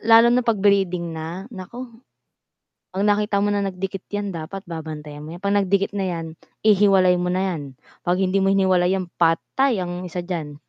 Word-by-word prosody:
Lalo 230 +1 +6
na 250 - +4
pag 230 -2 +1
breeding 180 -4 +2
na, 165 +4 -6
nako 230 +4 -9 1.0
pag 195 - 0
nakita 205 -1 +2
mo 205 - +1
na 205 - +1
nagdikit 195 0 -4
yan 205 -1 -3
dapat 175 +3 -6
babantayan 155 -4 -7
mo 165 - -7
yan 175 - -13
pag 200 - +1
nagdikit 200 -1 +2
na 200 -2 -2
yan 170 -2 -3 0.4
ihiwalay 195 -4 +5
mo 180 - -1
na 185 +1 0
yan, 165 -4 -4 0.5
pag 175 - +3
hindi 190 +1 +1
mo 195 - +2
hiniwalay 190 -2 +3 0.2
patay 185 +7 +2
ang 175 +1 -5
isa 175 0 -5
diyan. 165 -5 -4
190 Hz, 180 wpm, -22 LUFS, 175-205 Hz, 1.0 s, Lalo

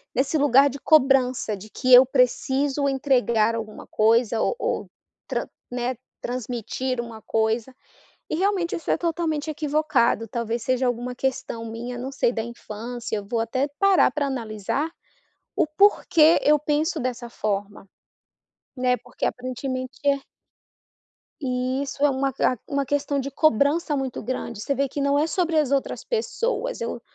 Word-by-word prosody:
nesse 270 +5 +1
lugar 280 -1 +5
de 280 - -8
cobrança 260 -7 +3
de 215 +3 -12
que 255 +3 +1
eu 250 +1 +10
preciso 270 +2 +1
entregar 245 -5 +2
alguma 220 -2 -6
coisa 225 +1 +2
ou - - +1
ou - - -2 0.4
tran - - -2 0.2
né, 245 +1 -2 0.3
transmitir 250 +1 -3
um 235 - -8 0.2
coisa, 225 +3 0 0.5
e - - -1
realmente 375 -2 0
isso 335 - -6
é - - +2
totalmente 325 -3 -1
equivocado, 295 -7 +1
talvez 235 +1 -3
seja 255 0 +1
alguma 245 +1 -2
questão 255 -3 -3
minha, 230 +2 -6
não 255 +2 -5
sei, 265 -3 +1
da 225 - -2
infância. 235 0 -6
Eu 205 - -5
vou 230 +3 -2
até 255 +5 0
parar 395 -2 +5
para 285 +1 -1
analisar 235 +3 -2 0.7
o - - +3
porquê 325 -2 +4
eu 300 +1 +5
penso 300 +3 0
dessa 245 -2 -4
forma, 205 -2 -3 0.9
né, 250 0 +2
porque - - -6
aparentemente 255 +1 -4
é 280 -1 +3 1.2
E 255 +1 -1
isso 280 +1 -1
é 290 - +5
uma 270 0 0 0.3
uma 280 -1 -1
questão 285 +1 0
de 275 +1 -4
cobrança 295 +3 +2
muito 265 -2 -3
grande, 235 -2 -4
você 280 - -1
vê 275 +1 +1
que 280 +2 -4
não 280 0 +2
é 305 +2 +2
sobre 340 -3 0
as 295 -4 +2
outras 275 -1 -1
pessoas, 475 +1 -2
eu 470 - -4
260 Hz, 150 wpm, -24 LUFS, 235-290 Hz, 1.2 s, eu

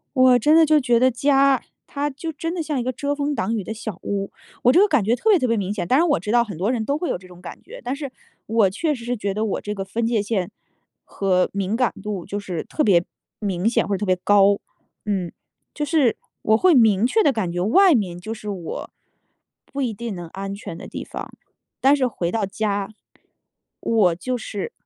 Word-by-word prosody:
我 255 -1 +6
真 300 +7 +4
的 325 - +7
就 305 0 +4
觉 245 -3 +3
得 255 +1 +4
家， 275 +1 +3 0.2
它 290 +1 -2
就 320 +4 -6
真 330 +3 -4
的 345 - -2
像 300 -4 -2
一 - - -1
个 255 +2 -2
遮 285 +3 -2
风 290 0 -1
挡 230 - -1
雨 210 - -2
的 205 - -5
小 220 -4 -6
屋。 200 -1 -3 0.3
我 250 - +5
这 350 - +6
个 415 - +5
感 290 - +2
觉 225 +4 +2
特 440 - +1
别 400 - +6
特 255 - 0
别 230 -1 +1
明 200 -1 -2
显， 205 -4 -3
当 260 - +3
然 340 +2 +3
我 290 - +2
知 210 +4 -3
道 240 0 +5
很 200 -7 -8
多 195 +6 0
人 230 -3 -1
都 280 +5 0
会 350 - -3
有 - - -1
这 185 0 -16
种 180 -1 -14
感 - - -10
觉。 - - -11
但 250 - -2
是 280 -1 -6 0.4
我 220 -3 +3
确 300 - -1
实 235 -4 -9
是 245 +1 -2
觉 200 -2 -3
得 215 +2 -1
我 210 - -2
这 210 - -4
个 195 -1 -4
分 225 +4 -2
界 230 -3 +1
线， 200 -4 -2 0.5
和 185 -2 0
敏 200 +2 -1
感 250 0 +1
度 205 -5 -4
就 205 - -4
是 180 -5 -5
特 305 - -1
别 180 -7 +4 0.3
明 195 -1 -1
显， 235 - +1
或 205 - -1
者 - - -2
特 210 - -3
别 185 -1 +3
高。 200 0 +5 0.5
嗯， 190 -4 -2 0.4
就 300 - -2
是 285 -6 +2 0.3
我 220 0 +4
会 365 +6 +4
明 225 -3 +5
确 440 - +3
地 290 - +3
感 215 -7 -2
觉 175 - -2
外 345 - +5
面 185 -7 -1
就 220 +5 -5
是 210 - -9
我 180 -5 -6 0.8
不 280 - -6
一 245 -4 -1
定 230 0 -5
能 175 -2 -7
安 195 +3 -6
全 185 -4 -8
的 - - -9
地 - - -6
方， - - -7 0.5
但 275 +2 +5
是 260 -3 +1
回 175 -7 -2
到 220 0 -1
家， 200 0 -2 0.9
我 205 -7 +3
就 250 +9 -3
是 205 -3 -5
225 Hz, 260 characters per minute, -22 LUFS, 195-270 Hz, 0.9 s, 的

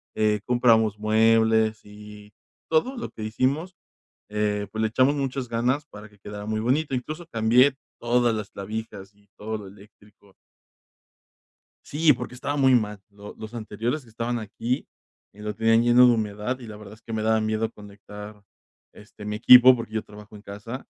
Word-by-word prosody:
eh, 105 -1 +1
compramos 115 -3 +3
muebles. 110 0 +2
Y, 105 0 -13 0.3
todo 245 +12 +1
lo 235 - -5
que 110 - -8
hicimos, 140 - -1 0.5
eh, 105 -1 -1
pues 110 - -3
le 110 - +2
echamos 130 +5 +3
muchas 135 -2 -3
ganas, 125 +6 -1
para 105 -6 -12
que 105 - -23
quedara 105 +1 -8
muy 110 0 -2
bonito. 135 +5 0
Incluso 155 +7 -5
cambié 125 +1 +3 0.3
todas 120 0 +2
las 105 -2 -5
clavijas 100 -1 -7
y 100 0 -29
todo 110 +1 -4
lo 105 - -9
eléctrico. 100 0 -19 1.5
Sí, 150 0 +3
porque 125 0 -7
estaba 145 +3 -3
muy 130 -2 +5
mal. 105 -3 -1
Lo 100 0 -12
los 110 +1 -9
anteriores 120 +5 -3
que 120 - -19
estaban 115 +2 -3
aquí, 115 +4 -3 0.5
y 100 - -19
lo 105 0 -4
tenían 115 +1 +3
lleno 120 +1 +6
de 120 - +5
humedad, 105 +3 -3
y 120 - -10
la 105 -1 -9
verdad 105 -1 -12
es - - -25
que 115 - -8
me 110 - -1
daba 110 0 +2
miedo 110 +1 -1
conectar, 105 0 -12 0.5
este, 105 0 -13
mi 105 0 -3
equipo, 125 +3 +8
porque 115 -2 -7
yo 110 - -2
trabajo 105 0 -14
en 105 - -12
casa. 110 +6 -8
110 Hz, 175 wpm, -25 LUFS, 105-125 Hz, 1.5 s, equipo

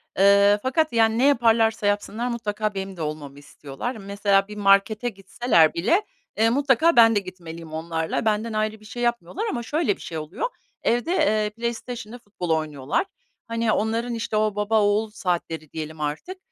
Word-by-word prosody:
E 195 - +2
ee, 200 +1 +6
fakat, 305 +3 +1
yani, 225 0 +3
ne 255 - +3
yaparlarsa 225 -5 +3
yapsınlar 210 +3 -1
mutlaka 215 -3 -2
benim 195 -1 -5
de - - -6
olmamı 150 -2 -5
istiyorlar. 145 - -7
Mesela, 200 -1 +1
bir 210 0 -9
markete 205 +3 +3
gitseler 195 -4 +2
bile, 330 - +2 0.4
eee, 225 +1 +4
mutlaka 285 +5 +3
ben 225 -1 +7
de - - +4
gitmeliyim 170 -4 -10
onlarla. 160 +3 -2
Benden 220 +1 0
ayrı 215 0 -1
bir 215 - -18
şey 240 +3 -6
yapmıyorlar 240 - -1
ama 235 - -3
şöyle 290 - 0
bir - - -17
şey 165 - -6
oluyor, 155 - -4 0.3
evde, 245 +9 +1
eee, 215 - +2
PlayStation'la 235 +1 -5
futbol 200 -6 -7
oynuyorlar. 155 - -1 0.4
Hani, 230 -1 0
onların, 230 +3 -1
işte, 225 -2 -2
o 215 -1 +1
baba 210 +1 +2
oğul 205 +2 +1
saatleri 170 -6 -3
diyelim 155 -1 -6
artık, 155 - -4
215 Hz, 170 wpm, -24 LUFS, 185-235 Hz, 0.4 s, ben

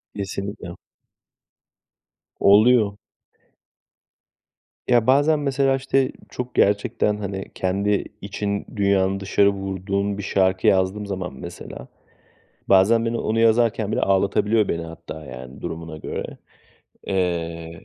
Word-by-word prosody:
Kesinlikle. 100 -2 -5 1.6
Oluyor. 105 0 +5 1.9
Ya, 120 -2 +3
bazen 145 +4 +4
mesela, 135 -1 +1
işte, 135 0 +1 0.2
çok 125 0 -6
gerçekten 105 +1 +2
hani 95 -1 -5
kendi 100 +2 0 0.2
için 100 0 -3
dünyanın 100 -1 +2
dışarı 100 +1 +3
vurduğun 100 +1 -2
bir 105 - -5
şarkı 95 -1 +1
yazdığım 95 +2 +2
zaman 95 -5 -5
mesela 60 -1 -9 0.8
bazen 110 +5 +5
beni 115 0 -1
onu 110 +1 -1
yazarken 115 -2 +2
bile - - 0
ağlatabiliyor 100 +2 +2
beni 85 0 -2
hatta, 80 -1 -9
yani, 65 +1 -10
durumuna 80 -1 -6
göre. - - -6 0.7
Eee, 85 -3 -3
100 Hz, 105 wpm, -22 LUFS, 95-110 Hz, 1.9 s, Oluyor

